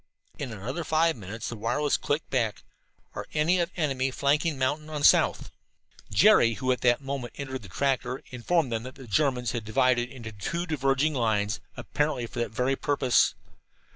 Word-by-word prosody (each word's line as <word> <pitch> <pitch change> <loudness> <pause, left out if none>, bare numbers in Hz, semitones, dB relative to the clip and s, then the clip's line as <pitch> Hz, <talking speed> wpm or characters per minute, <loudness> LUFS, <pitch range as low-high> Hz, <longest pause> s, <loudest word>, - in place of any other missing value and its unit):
In 135 -4 -4
another 120 - -4
five 160 +1 +2
minutes 105 0 -7
the 120 - -5
wireless 135 +7 0
clicked 145 +2 -2
back: 115 -5 -1 0.5
"Are - - -6
any 165 +4 +3
of 170 -1 0
enemy 135 -5 0
flanking 145 +3 +1
mountain 145 +4 -1
on 150 -2 -4
south?" - - +4 0.6
Jerry, 115 -1 +5
who 130 +4 0
at 125 - -1
that 120 +1 +3
moment 135 -3 -5
entered 130 -2 -5
the 100 - -12
tractor, 130 +3 -1
informed 130 +3 0
them 115 -1 -1
that 130 +2 -9
the 135 - -11
Germans 125 +1 +1
had 120 -3 -3
divided 120 +2 +2
into 120 -4 -9
two 170 - -3
diverging 145 -1 +1
lines, 110 -5 0 0.2
apparently 125 +2 -1
for 120 - -7
that 120 - -1
very 125 +5 0
purpose. 135 -3 +2
130 Hz, 170 wpm, -27 LUFS, 120-145 Hz, 0.6 s, Jerry